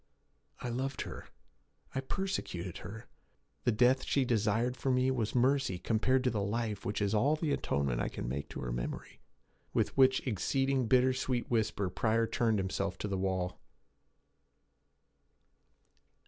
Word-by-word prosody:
'I 125 - -3
loved 130 +3 -2
her; - - -7 0.7
I 130 - -1
persecuted 130 - -3
her! 110 +3 -9 0.6
The - - +4
death 125 +4 +4
she 135 -2 +1
desired 115 +1 +1
for 135 - -2
me 130 0 +3
was 115 -4 -1
mercy 130 -5 +2
compared 125 +7 +1
to 125 - +2
the 105 - -1
life 105 0 -2
which 105 +1 -1
is 100 +1 0
all 135 +8 +3
the 155 -1 -1
atonement 70 - 0
I - - 0
can - - -5
make 70 +3 -3
to - - -6
her - - -3
memory.' - - -5 0.5
With - - +1
which 130 -1 +4
exceeding 135 +3 +1
bitter 130 +2 +4 0.4
whisper 105 -5 0
Pryor 115 +3 +2
turned 115 -1 +1
himself 95 0 -2
to - - -3
the 100 - -2
wall. 95 -1 -1
115 Hz, 145 wpm, -32 LUFS, 100-130 Hz, 0.7 s, The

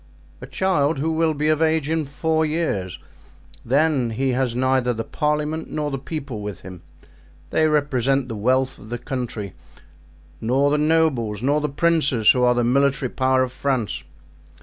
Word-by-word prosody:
"A - - -8
child 165 -6 +1
who 155 +4 -1
will 160 -1 +1
be 150 +1 -1
of 155 0 +1
age 160 -2 +2
in 160 -1 0
four 160 +3 0
years. 150 - -2 0.7
Then 140 -1 +2
he 130 +4 -1
has 125 -1 0
neither 130 -1 +1
the 115 - -3
parliament 150 +2 -2
nor 150 -1 -3
the 135 - -3
people 135 -6 -6
with 105 -2 -6
him—they 80 - -5
represent 135 -3 +1
the 115 - -5
wealth 130 +5 0
of 110 - -13
the 120 - -3
country; 120 -7 -5 0.9
nor 135 +5 +2
the 150 - +2
nobles 150 -9 +1
nor 145 +3 +2
the 150 - -1
princes, 145 -6 +3
who 125 - 0
are 125 0 +4
the 120 - +1
military 135 +1 +2
power 130 0 +2
of 130 - -3
France." 130 -4 -2
135 Hz, 165 wpm, -22 LUFS, 120-150 Hz, 0.9 s, are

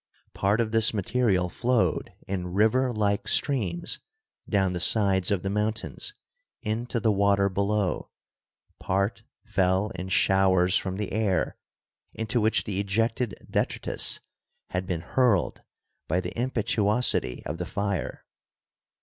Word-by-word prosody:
Part 100 +3 +1
of 115 -2 0
this 115 0 +4
material 100 -3 +1
flowed 120 +6 0 0.2
in 90 -2 -3
river 125 +5 +3
like 105 -3 0
streams 100 - +1 0.5
down 95 -3 +2
the 90 - -2
sides 95 -1 +3
of 100 -3 0
the 95 - -1
mountains 105 +1 -2 0.5
into 115 +3 -2
the 110 -1 +2
water 100 0 +3
below, 100 0 -1 0.7
part 100 +3 -1 0.2
fell 95 +2 +1
in 95 -2 -6
showers 95 -2 +3
from 95 -1 0
the 105 -1 -3
air 105 -3 0 0.6
into 110 +1 0
which 110 +1 +2
the 100 -2 -3
ejected 115 +4 0
detritus - - -1 0.5
had 90 0 -2
been 90 -4 -2
hurled 110 +1 +1 0.5
by 90 +3 +1
the - - -5
impetuosity 115 - 0
of 75 +3 -4
the 90 - -2
fire. 100 -1 -3
100 Hz, 125 wpm, -27 LUFS, 95-110 Hz, 0.7 s, this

